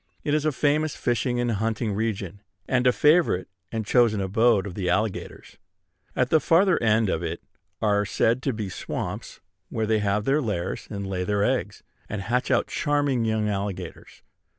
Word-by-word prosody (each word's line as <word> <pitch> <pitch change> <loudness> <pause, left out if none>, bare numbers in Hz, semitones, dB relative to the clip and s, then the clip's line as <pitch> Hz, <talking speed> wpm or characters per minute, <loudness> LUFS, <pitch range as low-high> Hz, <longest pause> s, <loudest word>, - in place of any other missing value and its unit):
It 145 - 0
is 155 0 +1
a 155 - +3
famous 150 +2 +1
fishing 120 +1 0
and 120 -1 0
hunting 110 0 -1
region, 100 -3 -3 0.3
and 130 -1 +2
a - - +7
favorite 150 - +3 0.2
and 110 -2 -3
chosen 115 -2 +3
abode 105 +1 +2
of 100 - -6
the 90 -2 -2
alligators. 105 +3 -2 0.6
At 125 +2 +1
the 160 - +6
farther 175 +5 +3
end 110 -1 +3
of 80 -3 -1
it 85 0 -4 0.4
are 105 -1 +3
said 115 +4 +1
to 135 - 0
be 110 -4 -4
swamps 95 - -5 0.3
where 110 -1 -1
they 110 0 +2
have 105 0 0
their 145 +3 +2
lairs, 95 -7 -3
and 100 -2 -5
lay 95 -1 -2
their 100 +1 0
eggs, 105 -5 -1 0.3
and 100 -2 -4
hatch 125 +4 0
out - - +3
charming 145 -5 0
young 110 -1 0
alligators. 100 -2 -5
110 Hz, 175 wpm, -25 LUFS, 100-125 Hz, 0.6 s, a